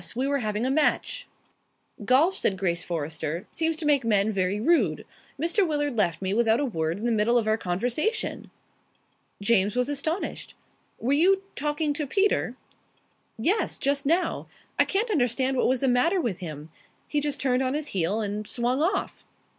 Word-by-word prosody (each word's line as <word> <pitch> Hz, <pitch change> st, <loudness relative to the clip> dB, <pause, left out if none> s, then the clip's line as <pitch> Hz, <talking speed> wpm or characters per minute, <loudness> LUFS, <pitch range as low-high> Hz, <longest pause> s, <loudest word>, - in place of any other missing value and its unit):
We 260 Hz, +3 st, 0 dB
were 280 Hz, 0 st, +1 dB
having 215 Hz, 0 st, -2 dB
a 260 Hz, -, +1 dB
match." 310 Hz, -, 0 dB, 0.8 s
"Golf," 300 Hz, -, +4 dB
said 195 Hz, -, +1 dB
Grace 170 Hz, -3 st, -1 dB
Forrester, 160 Hz, +1 st, -4 dB
"seems 325 Hz, -1 st, -1 dB
to 315 Hz, -, -4 dB
make 290 Hz, -3 st, +3 dB
men 210 Hz, -2 st, +2 dB
very 195 Hz, 0 st, 0 dB
rude. 225 Hz, -, +2 dB, 0.3 s
Mr. 345 Hz, +5 st, +2 dB
Willard 290 Hz, -4 st, -1 dB
left 180 Hz, -5 st, 0 dB
me 190 Hz, +1 st, 0 dB
without 225 Hz, +1 st, +3 dB
a 290 Hz, -, +1 dB
word 165 Hz, -7 st, -2 dB
in 215 Hz, -, -5 dB
the 240 Hz, -, +1 dB
middle 225 Hz, +2 st, +3 dB
of 230 Hz, -, +1 dB
our 215 Hz, -, +3 dB
conversation." 245 Hz, -, -2 dB, 0.9 s
James 205 Hz, 0 st, +3 dB
was 250 Hz, +2 st, +1 dB
astonished. 315 Hz, +6 st, -3 dB, 0.4 s
"Were 255 Hz, +4 st, 0 dB
you 380 Hz, +6 st, +4 dB
talking 295 Hz, +1 st, -1 dB
to 295 Hz, -1 st, -3 dB
Peter?" 400 Hz, +8 st, +1 dB, 0.8 s
"Yes. 365 Hz, -, 0 dB
Just 280 Hz, 0 st, 0 dB
now. 340 Hz, +4 st, 0 dB, 0.3 s
I -, -, +6 dB
can't 430 Hz, +4 st, 0 dB
understand 260 Hz, -, +1 dB
what 250 Hz, -, +2 dB
was 255 Hz, 0 st, +1 dB
the 270 Hz, -, +2 dB
matter 260 Hz, +10 st, +3 dB
with 230 Hz, -, -2 dB
him. 155 Hz, -3 st, -8 dB, 0.4 s
He 295 Hz, -, 0 dB
just 290 Hz, -1 st, -2 dB
turned 255 Hz, -1 st, +1 dB
on 260 Hz, +1 st, 0 dB
his 300 Hz, 0 st, -3 dB
heel 195 Hz, +4 st, 0 dB
and 210 Hz, 0 st, -3 dB
swung 250 Hz, +3 st, -1 dB
off." 380 Hz, +5 st, -1 dB
250 Hz, 175 wpm, -26 LUFS, 205-300 Hz, 0.9 s, I